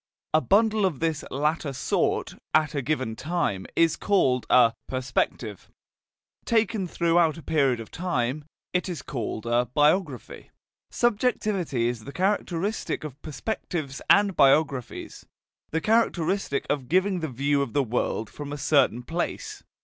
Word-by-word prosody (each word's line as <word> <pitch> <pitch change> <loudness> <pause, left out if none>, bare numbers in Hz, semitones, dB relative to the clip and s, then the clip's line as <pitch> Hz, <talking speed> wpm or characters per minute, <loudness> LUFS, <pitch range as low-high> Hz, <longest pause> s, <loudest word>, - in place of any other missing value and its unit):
A 155 - +5
bundle 215 +3 +3
of 180 -8 0
this 160 -2 -1
latter 150 +1 -1
sort, - - 0 0.2
at 155 0 +3
a 140 - -1
given 130 -5 -2
time, 140 - -2
is 165 -1 +3
called 135 - +1
a 120 -2 +6
"perspective"; 125 -5 -2 0.7
taken 220 -4 +1
throughout 170 -1 +2
a 165 - -10
period 135 -6 +2
of 115 - -9
time, 150 -5 -2 0.3
it 180 +1 0
is 175 - -5
called 115 -4 -4
a 120 +1 +1
"biography." 150 - +1 0.4
Subjectivity 205 - 0
is 120 -2 -4
the 140 - -7
characteristic 190 +2 -1
of 145 -2 -8
perspectives 155 - -4
and 200 -2 +5
biographies, 140 -2 +1 0.4
the 160 - -1
characteristic 195 -7 +1
of 140 -4 -2
giving 185 +1 +2
the 160 -2 -3
view 140 +3 +1
of 140 - -3
the 145 -1 +2
world 115 -2 -1
from 145 +4 -8
a 145 - -4
certain 140 -4 +2
place. 165 +7 -4
155 Hz, 140 wpm, -26 LUFS, 130-180 Hz, 0.7 s, a